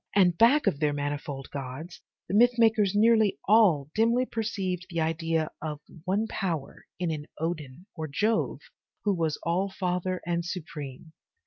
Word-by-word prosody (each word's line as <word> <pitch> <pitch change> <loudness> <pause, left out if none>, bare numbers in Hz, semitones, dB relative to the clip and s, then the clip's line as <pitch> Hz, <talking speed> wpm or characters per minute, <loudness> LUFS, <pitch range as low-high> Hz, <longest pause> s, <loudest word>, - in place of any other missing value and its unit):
And 180 -4 +5
back 255 - +5
of 140 - +1
their 150 -2 +1
manifold 145 -1 -4
gods, 140 +5 -7 0.3
the 180 - -4
myth 240 +3 +5
makers 220 -4 +3
nearly 220 -1 +4
all 180 -10 +4
dimly 230 +3 +3
perceived 195 -6 -3
the 170 -2 -2
idea 165 0 0
of 150 -2 -4 0.3
one 200 +4 +1
power 170 -10 -4
in 175 -2 -1
an 150 -1 -5
Odin 160 -1 -4
or 160 -2 -4
Jove 215 +10 0 0.4
who 205 - +2
was 165 -4 0
All 180 +4 +1
father 185 -1 -2
and 170 0 0
supreme. 155 -4 -7
175 Hz, 150 wpm, -28 LUFS, 155-210 Hz, 0.4 s, And